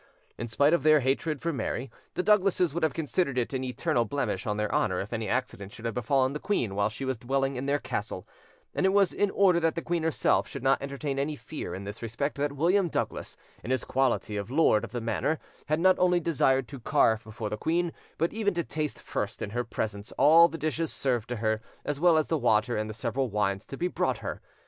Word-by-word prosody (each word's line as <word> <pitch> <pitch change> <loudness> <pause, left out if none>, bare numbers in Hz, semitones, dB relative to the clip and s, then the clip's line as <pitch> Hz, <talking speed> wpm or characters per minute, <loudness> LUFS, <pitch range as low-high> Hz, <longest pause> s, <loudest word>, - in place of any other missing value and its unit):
In 120 - -5
spite 140 +7 +3
of 170 - +3
their 155 0 +5
hatred 140 +3 0
for 170 0 -1
Mary, 125 0 -3 0.2
the 180 - 0
Douglases 195 -6 +3
would 170 - -2
have 160 -2 +1
considered 155 -3 -1
it 125 +2 -1
an 130 -1 -1
eternal 125 -1 0
blemish 110 -5 -2
on 105 -1 -1
their 105 -1 -1
honour 90 -1 +1
if 105 +5 -5
any 110 -1 -2
accident 120 -6 -2
should 115 - -10
have 115 - -1
befallen 130 +3 +1
the 150 - -4
queen 125 - -1
while 100 +1 +1
she 135 +5 -6
was 130 -3 -2
dwelling 135 +2 0
in 130 +2 -3
their 140 +1 +2
castle; 100 -8 -4 0.5
and - - +2
it 190 - +2
was 200 -2 +4
in 205 - +1
order 190 -3 +4
that 165 -1 +1
the 165 - -2
queen 170 -1 -1
herself 160 -8 +2
should - - -7
not 135 0 +3
entertain 140 0 -3
any 150 +2 -1
fear 155 +1 -6
in 95 - -6
this 100 +2 -7
respect 120 +6 -2
that 145 0 -1
William 175 +6 +2
Douglas, - - -3 0.3
in - - -7
his 130 0 0
quality 125 -5 0
of 100 +1 -4
lord 135 -6 +3
of - - -6
the 120 - -3
manor, 135 +7 0 0.3
had 155 +2 +1
not 185 +2 +4
only 180 -1 +4
desired 135 -5 +2
to 140 - -8
carve 110 -1 +2
before 110 0 -5
the - - 0
queen, 170 +8 0 0.2
but 165 +2 0
even 205 -3 0
to 170 - 0
taste 155 -1 -3
first - - -3
in 100 - -4
her 120 +2 -1
presence, 105 -2 -4
all 160 +4 +7
the 165 - -7
dishes 155 0 -1
served 120 -4 -1
to 120 - -2
her, 110 -1 0 0.2
as 145 -1 -2
well 170 -1 +5
as 155 - +1
the 160 - 0
water 120 0 +2
and 110 0 -2
the - - -5
several 125 +3 -1
wines 100 -2 -1
to 135 - -7
be 175 - 0
brought - - 0
her. - - -6
135 Hz, 240 wpm, -28 LUFS, 115-160 Hz, 0.5 s, all